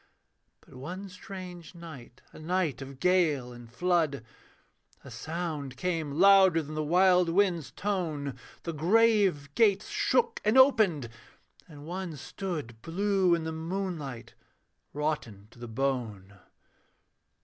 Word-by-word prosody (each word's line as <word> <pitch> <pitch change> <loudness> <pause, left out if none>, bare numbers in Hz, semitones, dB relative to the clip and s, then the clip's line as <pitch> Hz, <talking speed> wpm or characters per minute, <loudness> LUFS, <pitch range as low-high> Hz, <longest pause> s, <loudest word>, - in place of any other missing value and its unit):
But - - -20
one 180 +10 -7
strange 185 -2 -10
night, 140 -8 -12
a - - -12
night 160 -5 -1
of 135 0 -9
gale 155 -8 +2
and 120 -1 -13
flood, 160 -3 0 0.8
A - - -11
sound 155 -5 -5
came 160 -2 -2
louder 190 -1 +6
than 150 +1 -8
the 155 0 -2
wild 180 +2 +4
wind's 175 -4 +1
tone; 160 - -3 0.3
The 170 - -4
grave 190 -4 +3
gates 210 -1 +3
shook 470 -1 +1
and 215 +4 +3
opened: 215 - +5 0.6
and 150 -3 -12
one 175 -1 -5
stood 150 - -6
Blue 190 - +2
in 165 - -4
the 160 - -3
moonlight, 160 -6 -5 0.6
rotten 145 -9 -3
to 120 - -18
the 120 - -7
bone. 110 -6 -3
165 Hz, 125 wpm, -29 LUFS, 140-185 Hz, 0.8 s, louder